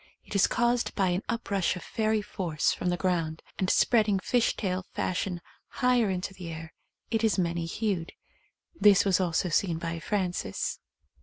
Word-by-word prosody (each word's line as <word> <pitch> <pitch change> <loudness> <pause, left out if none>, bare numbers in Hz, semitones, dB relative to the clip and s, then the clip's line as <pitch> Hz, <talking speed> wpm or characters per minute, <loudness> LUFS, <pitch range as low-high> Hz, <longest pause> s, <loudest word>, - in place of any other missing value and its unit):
It - - -9
is 200 - +4
caused 240 +1 +1
by 190 -3 +2
an 180 +2 0
uprush 200 -7 0
of 180 - -7
fairy 215 -1 0
force 170 -7 -1
from 180 - -2
the 175 - 0
ground 165 -4 -1
— - - -29
and 185 - +1
spreading 215 -4 +4
fish 235 +5 +1
tail 185 -3 -1
fashion 180 -1 -2 0.3
higher 250 -4 +2
into 185 +1 -3
the 180 -3 -8
air 165 0 -8 0.2
— - - -44
it 225 -1 +1
is 220 -2 +3
many 170 -2 0
hued. 185 -3 -2 0.6
This 205 - +5
was 195 -2 +3
also 180 0 +1
seen 170 +1 +1
by 165 0 -4
Frances. 180 - -2
185 Hz, 175 wpm, -28 LUFS, 170-215 Hz, 0.6 s, This